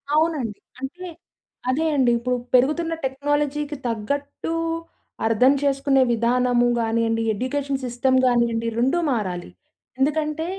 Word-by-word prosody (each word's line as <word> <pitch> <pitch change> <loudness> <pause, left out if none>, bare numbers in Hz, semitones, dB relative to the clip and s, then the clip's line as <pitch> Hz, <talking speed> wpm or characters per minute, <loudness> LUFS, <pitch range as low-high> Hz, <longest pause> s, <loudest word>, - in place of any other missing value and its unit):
అవునండి. 300 -9 0 0.2
అంటే 310 +8 -6 0.6
అదే 300 +5 +1
అండి. 255 -4 +3
ఇప్పుడు 250 +1 -1 0.2
పెరుగుతున్న 305 +6 +3
టెక్నాలజీ‌కి 290 +2 -1
తగ్గట్టు 280 +8 -3 0.7
అర్థం 250 +5 +4
చేసుకునే 275 -1 +2
విధానము 245 +1 +2
గానియండి, 225 0 0
ఎడ్యుకేషన్ 270 +4 -2
సిస్టమ్ 250 +2 +1
గానియండి, 235 -2 +2
రెండూ 270 +8 +2
మారాలి. 185 - -2 0.5
ఎందుకంటే 305 +2 0
260 Hz, 100 wpm, -23 LUFS, 235-290 Hz, 0.7 s, అర్థం